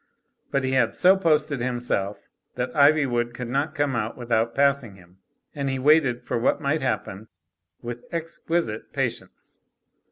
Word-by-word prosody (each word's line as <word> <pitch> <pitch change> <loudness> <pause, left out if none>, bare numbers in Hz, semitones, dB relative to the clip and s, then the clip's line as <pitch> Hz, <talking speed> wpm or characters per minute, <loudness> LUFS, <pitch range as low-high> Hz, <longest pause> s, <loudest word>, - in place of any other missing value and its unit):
But 135 - 0
he 130 - 0
had 130 -1 +2
so 185 +1 +5
posted 155 -6 +1
himself 120 -5 -2 0.4
that 125 0 -3
Ivywood 140 -5 +3
could 125 -2 -5
not 140 +5 -1
come 145 -3 0
out 110 -1 -2
without 115 -1 0
passing 140 -6 +1
him, 90 0 -20 0.3
and 140 -2 -2
he 135 - -1
waited 135 -3 +3
for - - -1
what 115 - +1
might 140 +3 0
happen 110 -5 -3 0.6
with 120 0 -6
exquisite 165 -7 -3
patience. - - -5
130 Hz, 150 wpm, -24 LUFS, 120-145 Hz, 0.6 s, so